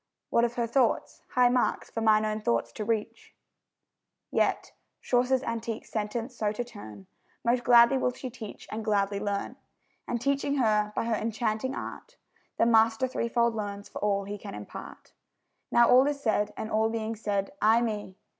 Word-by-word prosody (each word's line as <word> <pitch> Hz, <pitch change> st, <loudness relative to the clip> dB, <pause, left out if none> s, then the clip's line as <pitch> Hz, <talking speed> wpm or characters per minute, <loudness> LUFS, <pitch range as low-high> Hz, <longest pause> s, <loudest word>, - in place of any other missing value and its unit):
What 235 Hz, -, +3 dB
of 240 Hz, 0 st, -4 dB
her 235 Hz, -, 0 dB
thoughts, 235 Hz, +1 st, 0 dB
high 250 Hz, -1 st, +5 dB
marks 250 Hz, 0 st, 0 dB
for 225 Hz, -, -3 dB
mine 215 Hz, -1 st, +4 dB
own 215 Hz, 0 st, -2 dB
thoughts 115 Hz, -, 0 dB
to 215 Hz, -, -5 dB
reach? 215 Hz, -1 st, -3 dB, 1.0 s
Yet -, -, 0 dB, 0.3 s
(Chaucer's 250 Hz, +1 st, +1 dB
antique 230 Hz, -1 st, -4 dB
sentence 225 Hz, +3 st, -4 dB
so 215 Hz, -2 st, 0 dB
to 245 Hz, -, -3 dB
turn), 110 Hz, -, -11 dB, 0.4 s
Most 240 Hz, +1 st, +2 dB
gladly 235 Hz, +2 st, +6 dB
will 250 Hz, -, +1 dB
she 255 Hz, 0 st, -7 dB
teach, 225 Hz, -3 st, -9 dB
and 220 Hz, +1 st, -4 dB
gladly 200 Hz, -2 st, +1 dB
learn; 200 Hz, -1 st, -3 dB, 0.5 s
And 240 Hz, -, -1 dB
teaching 280 Hz, +2 st, 0 dB
her, 210 Hz, -5 st, +2 dB
by -, -, -1 dB
her 230 Hz, -, 0 dB
enchanting 220 Hz, +3 st, -1 dB
art, -, -, -8 dB, 0.4 s
The -, -, +4 dB
master 225 Hz, +2 st, +4 dB
threefold 235 Hz, -1 st, 0 dB
learns 205 Hz, -2 st, -5 dB
for -, -, -7 dB
all 200 Hz, -1 st, +1 dB
he 205 Hz, +1 st, -6 dB
can -, -, -8 dB
impart. 105 Hz, 0 st, -10 dB, 0.6 s
Now 235 Hz, 0 st, +6 dB
all 260 Hz, +2 st, +6 dB
is 290 Hz, -1 st, -1 dB
said, 215 Hz, -5 st, 0 dB
and 220 Hz, -, -5 dB
all 220 Hz, +1 st, +2 dB
being 225 Hz, 0 st, -3 dB
said, 205 Hz, 0 st, -2 dB
aye 225 Hz, +2 st, +5 dB
me! 210 Hz, -4 st, -4 dB
225 Hz, 175 wpm, -28 LUFS, 210-240 Hz, 1.0 s, gladly